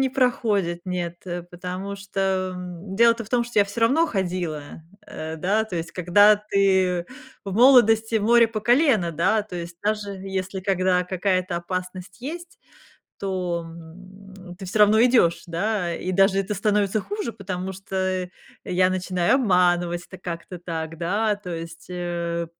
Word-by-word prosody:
не 265 - +2
проходит, 215 -9 0
нет, 175 -2 -3
э, 175 -1 -4
потому 180 +3 -6
что, 190 -1 -1
м, 180 +1 -8
дело-то 230 +1 +4
в 210 - -14
том, 240 0 +1
что 235 -2 -2
я 205 - +6
всё 205 +3 -5
равно 290 +9 +4
ходила, 175 - -3 0.2
э, 160 +1 -6
да, 200 +7 +1
то 200 -5 -6
есть, 165 0 -5
когда 205 +4 +5
ты 190 -4 +1 0.4
в 195 - -5
молодости- 225 -1 +5
море 230 +2 +4
по 220 -1 -4
колено, 235 - +3
да, 190 +7 +2
то 190 -4 -8
есть, 170 0 -7
даже 210 -1 -1
если 190 0 -4
когда 185 -1 +1
какая-то 185 -1 -1
опасность 185 +2 -6
есть, 335 +6 -7 0.6
то, 180 -3 -2
м, 185 +3 -13
ты 195 - -7
всё 205 +4 -1
равно 210 +2 +6
идёшь, 235 -9 +3
да? 175 0 -1
И 185 +2 -4
даже 195 +1 +4
это 195 +1 -1
становится 205 +1 +1
хуже, 410 - -4
потому 190 -3 -5
что 185 -1 -3 0.4
я 185 +1 +2
начинаю 185 +2 +1
обманывать 175 -6 +2
это 190 - -12
как-то 175 0 -7
так, 165 -2 -5
да? 210 +5 +1
То 205 -3 -11
есть, 165 0 -8
э, 170 -1 -3
190 Hz, 155 wpm, -24 LUFS, 175-210 Hz, 0.6 s, я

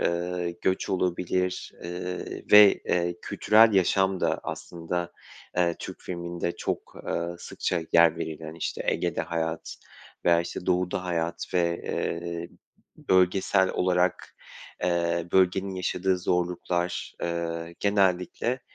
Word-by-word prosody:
ııı, 90 0 -1
göç 95 0 0
olabilir, 90 0 -1
ııı, 90 +1 -4 0.3
ve, 105 -1 +9
ııı, 85 0 +1
kültürel 110 +1 +5
yaşam 95 0 +2
da - - +1
aslında, 85 0 -4 0.4
eee, 85 -1 +2
Türk - - -8
filminde 85 -1 -4
çok, - - -4
ııı, 85 +1 -2
sıkça 85 - -2
yer 85 -1 +6
verilen, 80 -1 -5
işte, 85 - -3
Ege'de - - 0
hayat 80 -1 -3 0.5
veya, 85 -1 +5
işte, 85 +1 -6
Doğu'da 90 0 0
hayat 85 -1 -2
ve, 85 -1 +1
ııı, 85 0 -3 0.5
bölgesel 95 +1 +3
olarak, 90 0 0 0.5
eee, 85 -1 +1
bölgenin 95 +1 +2
yaşadığı 90 0 0
zorluklar, 90 0 -1
eee, 85 0 -3
genellikle, 100 +5 +1
90 Hz, 110 wpm, -27 LUFS, 85-90 Hz, 0.5 s, ve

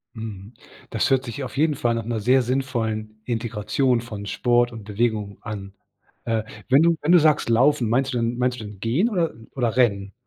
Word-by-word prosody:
Mhm, 110 -1 -8 0.4
das - - 0
hört 135 -1 +3
sich 135 +3 -6
auf 130 - -7
jeden 150 0 +2
Fall 120 -3 0
nach 115 - -2
'ner 115 -1 -2
sehr 125 +5 +4
sinnvollen 115 -4 -2
Integration 115 +2 0
von 105 -3 -7
Sport 120 +3 +2
und 110 - -8
Bewegung 105 -1 -1
an. 100 -3 -7 0.5
Äh, 115 -2 0 0.3
wenn 135 +3 +6
du 170 0 +4
wenn 155 +4 +1
du 175 - +8
sagst 155 -6 +3
laufen, 120 0 +3
meinst 130 +3 +1
du 125 - 0
dann 115 +1 -1
meinst 125 0 0
du - - -7
dann 105 -2 -10
gehen 135 - +1
oder 175 -7 0 0.2
oder 120 -4 0
rennen? 100 -5 +2
120 Hz, 200 wpm, -23 LUFS, 110-130 Hz, 0.5 s, du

